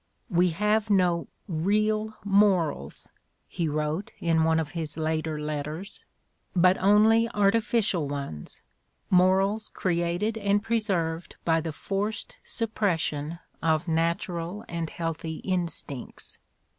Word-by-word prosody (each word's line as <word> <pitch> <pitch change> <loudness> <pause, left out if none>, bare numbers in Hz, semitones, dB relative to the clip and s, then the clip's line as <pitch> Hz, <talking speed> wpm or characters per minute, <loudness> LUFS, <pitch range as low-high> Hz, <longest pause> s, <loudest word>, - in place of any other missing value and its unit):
"We 180 +1 +4
have 210 +5 +1
no 180 -4 +2 0.2
real 215 +5 0
morals," 190 - +2 0.4
he 165 -3 -2
wrote 155 +5 -2
in 165 -1 +2
one 160 0 +3
of 150 -2 -3
his 160 -3 -4
later 155 -1 -1
letters, 150 +5 -5 0.5
"but 180 +1 +5
only 215 +4 +5
artificial 205 -5 +2
ones, 140 - -6 0.5
morals 195 +4 +3
created 175 +5 0
and 200 0 +2
preserved 185 -8 -1
by 165 -1 +3
the 160 0 -3
forced 205 - -3
suppression 170 -8 -1 0.2
of 160 +1 +1
natural 170 +3 -1
and 165 -1 -3
healthy 165 -1 -4
instincts." 170 -8 -3
175 Hz, 105 wpm, -27 LUFS, 160-205 Hz, 0.5 s, but